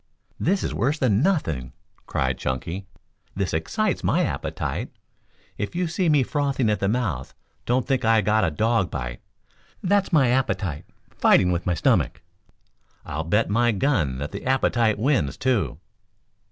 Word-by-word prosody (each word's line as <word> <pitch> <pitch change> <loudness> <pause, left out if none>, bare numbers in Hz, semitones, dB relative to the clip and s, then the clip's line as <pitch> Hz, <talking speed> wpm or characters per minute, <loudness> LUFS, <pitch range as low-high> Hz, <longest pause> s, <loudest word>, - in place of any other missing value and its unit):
"This 190 +3 +1
is - - -2
worse 135 +9 0
than 115 -6 +2
nothing," 80 - 0 0.3
cried 65 -1 -1
Chunky. 85 +9 -3 0.5
"This 100 -1 -2
excites 80 0 -1
my - - +2
appetite. - - -3 0.7
If 105 +8 -3
you 180 +1 0
see 175 +1 0
me 145 -3 +4
frothing 135 -4 0
at 105 - 0
the 100 - 0
mouth 100 - -2 0.3
don't 125 +1 +2
think 135 -2 0
I've 110 -2 +3
got 110 +1 +3
a 95 - +2
dog 110 +3 +1
bite. - - -5 0.6
That's 200 +1 +2
my 140 -7 +4
appetite 105 - -1 0.3
fighting 90 - +5
with 85 +1 -2
my 90 - +2
stomach. - - +1 0.8
I'll 75 +3 -3
bet 105 +7 +1
my 120 +2 +3
gun 95 - 0
that 70 +3 -5
the - - -6
appetite 120 -4 +2
wins 105 - +1
too." 120 - 0
110 Hz, 155 wpm, -24 LUFS, 85-130 Hz, 0.8 s, fighting